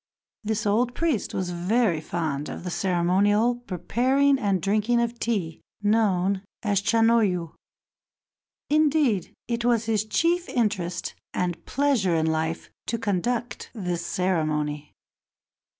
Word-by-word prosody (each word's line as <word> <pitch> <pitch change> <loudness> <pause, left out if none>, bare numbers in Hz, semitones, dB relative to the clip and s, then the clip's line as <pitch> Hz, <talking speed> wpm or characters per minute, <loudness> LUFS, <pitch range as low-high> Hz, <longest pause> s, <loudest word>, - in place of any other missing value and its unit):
This 215 +1 -1
old 235 +4 +1
priest 315 -9 0
was 185 -1 -2
very 180 0 +1
fond 155 -3 -3
of - - -7
the 180 - -4
ceremonial 195 +7 +2
preparing 255 - +1
and 200 -5 +1
drinking 215 +6 +1
of 235 0 -1
tea 190 -9 -2 0.2
known 200 -3 +2 0.2
as 200 -3 +1
Chanoyu; 215 -7 +2 1.1
indeed, 290 - +2 0.2
it 235 0 -2
was 235 -2 +2
his 220 -2 +1
chief 340 +11 +1
interest 190 -7 -1 0.2
and 175 -2 -2
pleasure 260 -11 +1
in 160 -1 +1
life 160 +1 -2 0.2
to 230 - -1
conduct 230 +4 -2
this 180 -5 -3
ceremony. 155 -5 -1
205 Hz, 120 wpm, -25 LUFS, 175-235 Hz, 1.1 s, ceremonial